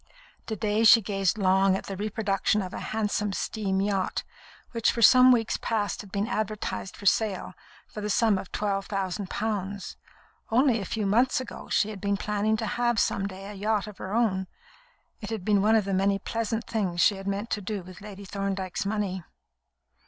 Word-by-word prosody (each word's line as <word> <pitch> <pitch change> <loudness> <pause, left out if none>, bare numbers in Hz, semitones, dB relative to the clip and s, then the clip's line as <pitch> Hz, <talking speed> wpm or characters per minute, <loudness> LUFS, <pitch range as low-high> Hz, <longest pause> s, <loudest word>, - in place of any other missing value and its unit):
To 220 - -2
day 210 +2 0
she 230 +1 +9
gazed 195 -2 0
long 190 -1 +3
at - - -7
the 195 - -6
reproduction 205 0 0
of 185 - -7
a - - -4
handsome 210 -2 -1
steam 195 -2 -1
yacht, 195 -2 -1 0.5
which 230 -2 +2
for 235 - -1
some 255 +3 +8
weeks 230 -3 +2
past 210 -3 -1
had 200 -2 -14
been 200 +1 0
advertised 215 -3 -3
for 200 - -11
sale, 205 -1 +1 0.3
for 210 - -8
the 210 - -3
sum 215 -2 +3
of 190 - -9
twelve 195 -1 -1
thousand 195 -1 -3
pounds. 200 -4 -3 0.5
Only 245 0 +3
a - - -5
few 215 +2 -2
months 240 +7 +3
ago, 255 - -8
she 215 - +2
had 200 - -9
been 200 -1 0
planning 210 +2 0
to 225 - -3
have 240 +2 0
some 195 -1 +1
day 190 0 -9
a 205 - -7
yacht 210 +1 0
of 210 -2 -11
her 190 - -6
own. 190 -5 +1 0.7
It 210 - -7
had 220 -5 -4
been 205 -2 +3
one 215 +2 +4
of 215 -3 +3
the 195 - -2
many 195 +1 +2
pleasant 225 +2 -3
things 190 -6 -2
she 200 - +4
had 195 0 -8
meant 200 +3 -3
to 210 - -1
do 200 -1 -4
with 185 +2 -12
Lady 200 -1 -9
Thorndyke's 195 -1 -3
money. 200 -3 -2
205 Hz, 195 wpm, -27 LUFS, 195-220 Hz, 0.7 s, she